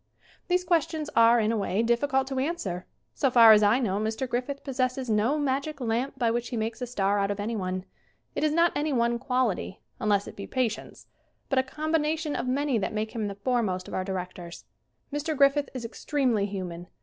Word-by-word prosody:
These 360 0 +2
questions 320 -3 0
are, 230 +1 +6
in 220 0 +2
a 230 - 0
way, 200 +1 0
difficult 265 +3 +2
to 265 -1 -2
answer. 215 - -3 0.3
So 270 - +1
far 235 -3 +8
as 215 -1 +7
I 210 +3 +4
know 205 -6 0
Mr. 220 +4 -2
Griffith 250 +4 -3
pos 270 -2 -6
sesses 255 -1 0
no 220 +8 +2
magic 280 +1 -1
lamp 245 +3 -1
by 235 -3 +2
which 240 0 -2
he 240 - -3
makes 225 +3 -3
a 250 - -2
star 205 -4 +1
out 200 0 +1
of 205 0 -3
anyone. 190 -4 -3 0.5
It - - -2
is 305 - +3
not 335 +2 +4
any 295 +1 0
one 235 -1 +1
quality 250 -7 -1 0.2
unless 205 -4 +1
it - - -9
be 200 - -7
patience 245 -4 -3 0.4
but 270 - +3
a - - +5
combination 310 +2 -1
of 240 - -2
many 270 -1 +1
that 205 - -2
make 215 +1 -2
him 220 -3 -2
the 200 - -5
foremost 200 -4 -1
of - - -9
our 185 - -1
directors. 180 -2 -6 0.5
Mr. 300 +1 -2
Griffith 280 +1 +4
is 245 -2 -4
extremely 240 -4 0
human. 180 -3 -6
240 Hz, 205 wpm, -27 LUFS, 210-275 Hz, 0.5 s, far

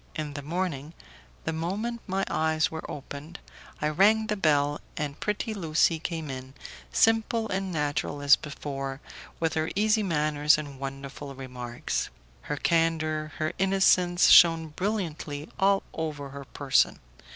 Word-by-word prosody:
In 150 -2 -4
the 145 - -5
morning, 160 -1 -3 0.5
the 160 - -2
moment 205 +9 -3
my 195 0 0
eyes 160 0 +1
were 160 0 -6
opened, 145 +4 -8 0.4
I 150 - +1
rang 210 +7 +4
the 210 - -1
bell, 145 -5 +2 0.2
and 145 -2 -3
pretty 210 +1 -2
Lucie 165 -3 +2
came 160 -3 -4
in, 130 +1 -8 0.4
simple 225 0 +2
and 190 0 -2
natural 145 -2 -1
as 145 -1 +7
before, 135 -2 -5 0.4
with 165 -1 0
her 155 0 0
easy 215 +2 +3
manners 150 -5 +2
and 145 -3 -7
wonderful 135 +1 -7
remarks. 125 -2 -4 0.4
Her 145 - -1
candour, 155 -2 +1
her 155 0 -1
innocence 185 -2 +4
shone 165 -2 +7
brilliantly 160 -5 -3
all 195 0 +3
over 150 -3 -4
her 140 0 -9
person. 140 0 +2
155 Hz, 140 wpm, -27 LUFS, 145-185 Hz, 0.5 s, as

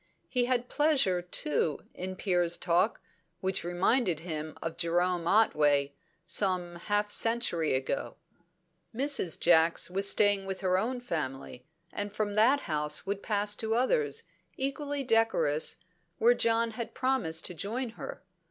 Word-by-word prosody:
He 250 -2 +1
had 245 -1 0
pleasure, 275 - +2
too, 150 -4 0
in 185 +1 -5
Piers' 175 -3 +1
talk, 180 +5 +1 0.4
which 190 0 -1
reminded 175 - +1
him 155 -2 -6
of 165 0 -5
Jerome 175 0 0
Otway, 145 -9 +3 0.3
some 180 -2 +1
half 205 +3 -1
century 210 - +2
ago. 130 0 -3 0.8
Mrs. 270 - +1
Jacks 165 +1 +3
was 195 +2 +2
staying 205 -2 +3
with 190 -1 -5
her 185 -1 +1
own 245 +4 -2
family, 135 - -5 0.3
and 205 0 -3
from 210 0 -2
that 245 +7 +4
house 150 -2 -1
would 200 0 -3
pass 205 -1 0
to 220 0 -1
others, 445 - 0 0.3
equally 280 +1 -2
decorous, 225 - +1 0.4
where 235 +2 +5
John 230 -1 +1
had 230 +1 -6
promised 255 -12 0
to - - -5
join 230 +9 -3
her. 225 - -9
195 Hz, 135 wpm, -29 LUFS, 170-230 Hz, 0.8 s, where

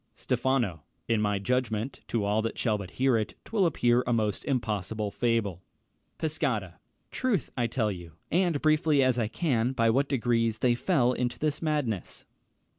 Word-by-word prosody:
Stephano. 120 - 0 0.3
In 115 -2 +2
my 105 -1 +1
judgment, 115 +2 -1
To 110 -3 -1
all 105 +2 +2
that 115 - -3
shall 110 -4 +1
but 100 -3 -5
hear 130 -2 +3
it, 110 -2 -3
'twill 205 -5 +2
appear 120 -5 +2
A - - +1
most 110 -3 0
impossible 110 -5 -2
fable. 115 -7 0 0.6
Pescara. 130 - -2 0.3
Troth, 230 - -1
I'll 120 -1 +1
tell 115 -2 0
you, 85 -4 -9 0.2
And 175 -3 +2
briefly 155 -2 +4
as 130 -1 +2
I 110 - +1
can, 125 -2 0
by 115 -3 +3
what 135 +4 +1
degrees 115 -4 +1
They 120 +1 +3
fell 125 -2 +2
into 125 -1 -2
this 150 -1 -1
madness. 145 - -2
120 Hz, 165 wpm, -28 LUFS, 110-135 Hz, 0.6 s, briefly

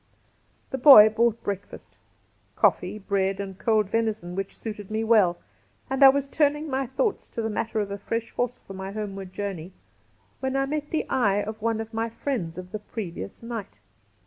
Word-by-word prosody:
The 265 - -3
boy 240 -6 +10
brought 230 +1 +1
breakfast 200 0 -6 0.3
— - - -40
coffee, - - +2
bread, 195 -1 -1
and 195 -1 -6
cold 215 -3 +2
venison, 215 -4 -1
which 195 +1 -5
suited 210 -3 -7
me 220 +1 -1
well 210 -6 +4 0.3
— 100 - -38
and 265 +1 +3
I 270 - +11
was 280 +1 +1
turning 295 +1 +1
my 265 0 -1
thoughts 400 - -1
to 230 - -4
the 220 - -1
matter 220 +1 -2
of 205 -1 -2
a 200 - -4
fresh 230 +3 -3
horse 245 0 -2
for 195 - -12
my 190 +1 -6
homeward 195 -3 -5
journey 190 -3 -5 0.7
when 265 0 -2
I 270 0 +2
met 295 +1 -3
the 315 - -1
eye 205 -5 +2
of 215 +1 -7
one 225 0 0
of 225 0 -6
my 225 +1 -1
friends 220 - -3
of 185 0 -8
the 215 - -4
previous 190 - -7
night. 225 - -6
215 Hz, 195 wpm, -25 LUFS, 195-245 Hz, 0.7 s, I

